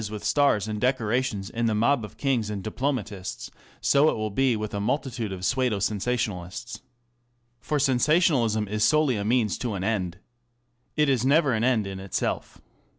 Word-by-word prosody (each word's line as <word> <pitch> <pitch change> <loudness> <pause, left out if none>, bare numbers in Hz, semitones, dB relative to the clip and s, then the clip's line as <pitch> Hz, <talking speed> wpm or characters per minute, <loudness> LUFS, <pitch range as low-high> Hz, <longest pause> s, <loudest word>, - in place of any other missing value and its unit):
with 105 -1 -7
stars 140 -8 +2
and 105 -1 -4
decorations 125 -4 0
in 115 0 -1
the 110 - +1
mob 120 +3 +2
of 105 - -9
kings 125 -6 0
and 100 -2 -4
diplomatists, 110 -5 -3 0.3
so 140 +2 +4
will 110 -8 +1
it - - -12
be 130 0 +2
with 105 0 -4
a 100 - -2
multitude 120 -1 -2
of 95 -1 -5
pseudo 130 -3 +1
sensationalists. 110 +1 -3 0.8
For 125 +6 -2
sensation 145 +5 +3
alism 110 -4 0
is 105 +1 -1
solely 150 +2 +3
a 100 - -2
means 115 0 +1
to 120 -5 -2
an 95 - -4
end. 95 -5 -1 0.8
It 150 0 +3
is 130 -4 +2
never 140 0 +3
an 110 0 0
end 120 -4 +2
in 95 -1 -6
itself. 95 -1 -3
115 Hz, 175 wpm, -26 LUFS, 105-130 Hz, 0.8 s, so